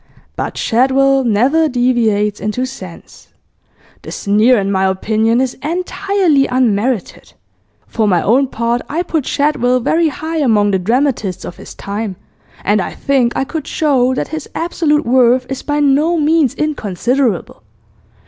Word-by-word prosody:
"But -, -, -4 dB
Shadwell 270 Hz, +3 st, +2 dB
never 260 Hz, +8 st, +2 dB
deviates 230 Hz, -5 st, +1 dB
into 215 Hz, +5 st, -2 dB
sense." 190 Hz, -10 st, -11 dB, 0.7 s
The -, -, -9 dB
sneer, 215 Hz, +5 st, +2 dB
in 200 Hz, -1 st, -1 dB
my 190 Hz, -1 st, +1 dB
opinion, 220 Hz, +4 st, +1 dB
is 260 Hz, -1 st, 0 dB
entirely 350 Hz, -2 st, 0 dB
unmerited. 245 Hz, -3 st, -1 dB, 0.5 s
For 220 Hz, -2 st, -1 dB
my 180 Hz, -4 st, +2 dB
own 265 Hz, +5 st, +3 dB
part, 235 Hz, 0 st, -1 dB
I 335 Hz, +4 st, -1 dB
put 320 Hz, -6 st, -2 dB
Shadwell 255 Hz, -4 st, +1 dB
very 320 Hz, +7 st, +1 dB
high 315 Hz, +2 st, -4 dB
among 215 Hz, -7 st, +2 dB
the 190 Hz, -, +1 dB
dramatists 225 Hz, -1 st, -1 dB
of 175 Hz, -, -8 dB
his -, -, -11 dB
time, 205 Hz, 0 st, -5 dB, 0.5 s
and 205 Hz, 0 st, +2 dB
I -, -, -5 dB
think 260 Hz, -4 st, +1 dB
I -, -, 0 dB
could 300 Hz, +1 st, -6 dB
show 260 Hz, -4 st, +1 dB
that -, -, -3 dB
his 315 Hz, -1 st, -6 dB
absolute 320 Hz, -3 st, 0 dB
worth 250 Hz, +1 st, +3 dB
is 270 Hz, -, -4 dB
by 295 Hz, 0 st, -2 dB
no 295 Hz, +4 st, +2 dB
means 305 Hz, -3 st, +2 dB
inconsiderable. 245 Hz, -, -1 dB
255 Hz, 145 wpm, -15 LUFS, 215-290 Hz, 0.7 s, own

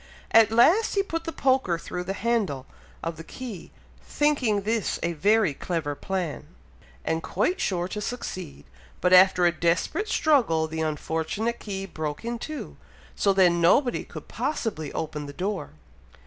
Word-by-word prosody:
At 225 Hz, -1 st, +7 dB
last 320 Hz, -, +4 dB
he 395 Hz, -, +3 dB
put 330 Hz, -4 st, -4 dB
the 330 Hz, -, -3 dB
poker 260 Hz, -, +1 dB
through 180 Hz, +1 st, -5 dB
the 195 Hz, -, -2 dB
handle 205 Hz, -, 0 dB, 0.4 s
of 165 Hz, -1 st, -3 dB
the 165 Hz, -, -8 dB
key, 225 Hz, -1 st, -8 dB, 0.3 s
thinking 265 Hz, -9 st, +1 dB
this 220 Hz, 0 st, 0 dB
a 170 Hz, 0 st, 0 dB
very 205 Hz, +1 st, +3 dB
clever 160 Hz, -1 st, -3 dB
plan, 180 Hz, 0 st, -4 dB, 0.6 s
and 160 Hz, 0 st, 0 dB
quite 360 Hz, -, -1 dB
sure 175 Hz, -2 st, 0 dB
to 210 Hz, -, -4 dB
succeed, 185 Hz, -9 st, -6 dB, 0.3 s
but 180 Hz, 0 st, +2 dB
after 185 Hz, -1 st, +7 dB
a 175 Hz, -, +5 dB
desperate 170 Hz, -, 0 dB
struggle, 215 Hz, -, +3 dB
the 160 Hz, 0 st, -4 dB
unfortunate 160 Hz, +9 st, -2 dB
key 195 Hz, -2 st, -5 dB
broke 155 Hz, 0 st, -5 dB
in 235 Hz, 0 st, -3 dB
two, 310 Hz, +3 st, -6 dB, 0.4 s
so 200 Hz, -, +3 dB
then 180 Hz, -3 st, +4 dB
nobody 245 Hz, +9 st, +3 dB
could -, -, -10 dB
possibly 200 Hz, -, -3 dB
open 150 Hz, -2 st, -4 dB
the 145 Hz, -, -8 dB
door! 195 Hz, +6 st, -3 dB
190 Hz, 155 wpm, -26 LUFS, 165-235 Hz, 0.6 s, At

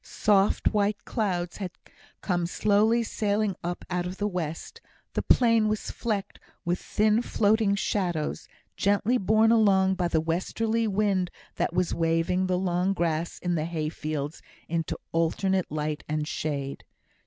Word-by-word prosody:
Soft 200 Hz, +1 st, +2 dB
white 205 Hz, 0 st, 0 dB
clouds 180 Hz, -6 st, -2 dB
had 190 Hz, -3 st, -4 dB, 0.5 s
come 175 Hz, -3 st, 0 dB
slowly 215 Hz, +5 st, +3 dB
sailing 210 Hz, -2 st, 0 dB
up 175 Hz, +1 st, -4 dB
out 180 Hz, -1 st, -2 dB
of 185 Hz, +1 st, -6 dB
the 205 Hz, -, 0 dB
west; 165 Hz, -5 st, -5 dB, 0.3 s
the -, -, 0 dB
plain 230 Hz, -3 st, +4 dB
was 215 Hz, 0 st, -2 dB
flecked 205 Hz, -4 st, -3 dB, 0.3 s
with 175 Hz, +1 st, 0 dB
thin 215 Hz, +2 st, +2 dB
floating 210 Hz, -2 st, +2 dB
shadows, 175 Hz, -6 st, -1 dB, 0.3 s
gently 205 Hz, +5 st, +2 dB
borne 220 Hz, +3 st, +4 dB
along 195 Hz, -4 st, +4 dB
by 180 Hz, -2 st, 0 dB
the 165 Hz, -2 st, +1 dB
westerly 220 Hz, +8 st, 0 dB
wind 195 Hz, -3 st, +1 dB, 0.3 s
that -, -, 0 dB
was 180 Hz, -1 st, +1 dB
waving 165 Hz, +3 st, +1 dB
the 180 Hz, -1 st, +1 dB
long 180 Hz, +1 st, +1 dB
grass 170 Hz, -2 st, -1 dB
in 175 Hz, -1 st, 0 dB
the 155 Hz, -2 st, 0 dB
hay 160 Hz, -2 st, -2 dB
fields 150 Hz, -1 st, -4 dB, 0.3 s
into 165 Hz, -1 st, -2 dB, 0.2 s
alternate 180 Hz, +3 st, +1 dB
light 150 Hz, 0 st, -2 dB
and 150 Hz, 0 st, -1 dB
shade. 140 Hz, -3 st, -3 dB
185 Hz, 145 wpm, -27 LUFS, 165-210 Hz, 0.5 s, plain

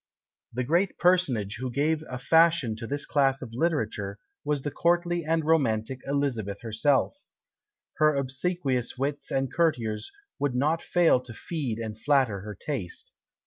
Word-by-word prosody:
The 125 Hz, +2 st, -2 dB
great 170 Hz, +8 st, +1 dB
personage 135 Hz, -, +2 dB
who 130 Hz, 0 st, -3 dB
gave 150 Hz, +5 st, 0 dB
a 125 Hz, -, -4 dB
fashion 160 Hz, -2 st, +3 dB
to 115 Hz, -, -6 dB
this 145 Hz, +2 st, -3 dB
class 135 Hz, -2 st, +2 dB
of 115 Hz, -3 st, -9 dB
literature 110 Hz, -9 st, -1 dB, 0.3 s
was 145 Hz, -2 st, -1 dB
the 145 Hz, -, -2 dB
courtly 175 Hz, +1 st, +1 dB
and 160 Hz, 0 st, 0 dB
romantic 130 Hz, -6 st, +1 dB
Elizabeth 125 Hz, -8 st, -1 dB
herself; 130 Hz, -, +1 dB, 0.8 s
her 155 Hz, -1 st, +4 dB
obsequious 135 Hz, -1 st, -1 dB
wits 140 Hz, +2 st, -2 dB
and 135 Hz, -1 st, -1 dB
courtiers 115 Hz, -10 st, 0 dB, 0.3 s
would 140 Hz, -3 st, 0 dB
not 150 Hz, +6 st, +1 dB
fail 175 Hz, -7 st, +3 dB
to 125 Hz, -2 st, -10 dB
feed 140 Hz, -10 st, -3 dB
and 110 Hz, -2 st, -5 dB
flatter 130 Hz, -7 st, +2 dB
her 105 Hz, 0 st, -7 dB
taste. 100 Hz, -, -5 dB
135 Hz, 145 wpm, -27 LUFS, 115-160 Hz, 0.8 s, her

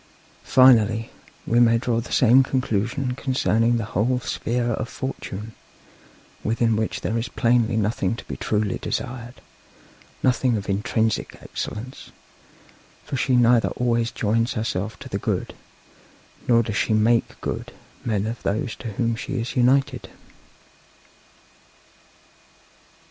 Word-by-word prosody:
Finally, 115 Hz, -4 st, +4 dB, 0.3 s
we 120 Hz, -, +2 dB
may 115 Hz, -1 st, +5 dB
draw 115 Hz, 0 st, 0 dB
the 115 Hz, -, -10 dB
same 125 Hz, +1 st, +6 dB
conclusion 125 Hz, 0 st, -1 dB
concerning 120 Hz, -3 st, +1 dB
the 115 Hz, -, -2 dB
whole 125 Hz, +6 st, +1 dB
sphere 120 Hz, 0 st, -2 dB
of 110 Hz, +1 st, -3 dB
Fortune, 110 Hz, -5 st, -6 dB, 0.9 s
within 115 Hz, 0 st, +1 dB
which 110 Hz, 0 st, -2 dB
there 115 Hz, +2 st, -1 dB
is 115 Hz, -, -3 dB
plainly 115 Hz, -1 st, +2 dB
nothing 105 Hz, -1 st, 0 dB
to -, -, -10 dB
be -, -, -6 dB
truly 105 Hz, -2 st, -1 dB
desired, 120 Hz, 0 st, -4 dB, 0.9 s
nothing 125 Hz, -2 st, +2 dB
of 100 Hz, -, -6 dB
intrinsic 110 Hz, +2 st, -1 dB
excellence; 125 Hz, +5 st, -6 dB, 0.9 s
for -, -, -5 dB
she 130 Hz, 0 st, +1 dB
neither 120 Hz, -1 st, +4 dB
always 120 Hz, -1 st, +1 dB
joins 115 Hz, +3 st, 0 dB
herself 110 Hz, -3 st, -3 dB
to -, -, -10 dB
the -, -, -3 dB
good, -, -, -2 dB, 0.9 s
nor 115 Hz, -1 st, +5 dB
does 105 Hz, -1 st, -3 dB
she 110 Hz, -, +1 dB
make 115 Hz, +2 st, +2 dB
good -, -, -4 dB, 0.3 s
men 105 Hz, -3 st, 0 dB
of 115 Hz, +1 st, -4 dB
those 110 Hz, +4 st, -2 dB
to 115 Hz, -3 st, -6 dB
whom 115 Hz, +2 st, 0 dB
she 130 Hz, +3 st, -4 dB
is 115 Hz, -, -4 dB
united.' 130 Hz, +2 st, +2 dB
115 Hz, 125 wpm, -23 LUFS, 110-125 Hz, 0.9 s, same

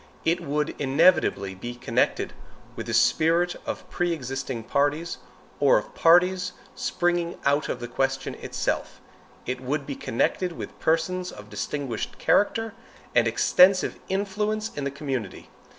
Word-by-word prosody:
It 170 Hz, +2 st, +2 dB
would 150 Hz, -1 st, -1 dB
inevitably 140 Hz, -, +3 dB
be 120 Hz, +6 st, -7 dB
connected 120 Hz, -, 0 dB, 0.4 s
with -, -, -6 dB
the -, -, -3 dB
spirit 170 Hz, +2 st, +3 dB
of -, -, -5 dB
pre 175 Hz, -1 st, 0 dB
existing 130 Hz, -4 st, -4 dB
parties, 145 Hz, +7 st, 0 dB, 0.4 s
or 140 Hz, -1 st, +5 dB
of 105 Hz, -, -4 dB
parties 180 Hz, +2 st, +4 dB, 0.2 s
springing 175 Hz, -1 st, -1 dB
out 145 Hz, +2 st, +2 dB
of 125 Hz, -, -2 dB
the 120 Hz, -, -5 dB
question 135 Hz, +2 st, -1 dB
itself. -, -, -2 dB, 0.5 s
It 125 Hz, +1 st, -3 dB
would 140 Hz, +2 st, -2 dB
be 140 Hz, -, -4 dB
connected 175 Hz, +11 st, 0 dB
with -, -, -8 dB
persons 180 Hz, +3 st, 0 dB
of -, -, -12 dB
distinguished 135 Hz, -6 st, -4 dB
character 225 Hz, +2 st, +2 dB, 0.4 s
and 120 Hz, -1 st, +4 dB
extensive 185 Hz, +11 st, +4 dB
influence 210 Hz, +3 st, -1 dB
in 145 Hz, -, -3 dB
the -, -, 0 dB
community. 135 Hz, -8 st, -5 dB
150 Hz, 135 wpm, -26 LUFS, 135-180 Hz, 0.5 s, or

